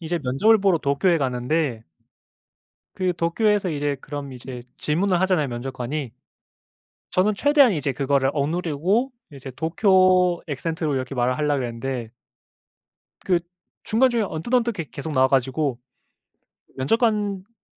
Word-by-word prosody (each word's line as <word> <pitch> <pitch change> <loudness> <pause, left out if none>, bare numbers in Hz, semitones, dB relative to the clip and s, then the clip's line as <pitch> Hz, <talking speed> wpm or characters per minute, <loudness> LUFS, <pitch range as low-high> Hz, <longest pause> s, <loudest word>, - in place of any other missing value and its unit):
이제 170 +1 -2
면접을 205 - +3
보러 195 -4 +2
도쿄에 155 +5 +1
가는데 125 -1 -1 1.1
그 185 -1 0
도쿄에서 195 +4 +1
이제 145 -2 -1
그럼 140 -2 -7
이제 125 0 -8 0.2
질문을 180 +4 +1
하잖아요 180 -7 +2
면접관이. 125 +2 -4 1.0
저는 200 +3 +2
최대한 285 -1 +4
이제 145 -4 -1
그거를 135 0 +1
억누르고 175 - 0 0.2
이제 135 -1 -9
도쿄 185 - +3
악센트로 155 +1 -2
이렇게 130 0 -3
말을 125 +1 0
하려고 150 -2 +1
그랬는데 120 -1 -4 1.2
그 180 -2 +3 0.4
중간 255 +4 +3
중간에 230 -3 0
언뜻언뜻 235 +8 0
계 165 - -3
계속 155 +3 -6
나와 130 -1 +4
가지고 135 0 0 1.0
면접관분이 210 - -1
155 Hz, 310 characters per minute, -23 LUFS, 135-190 Hz, 1.2 s, 최대한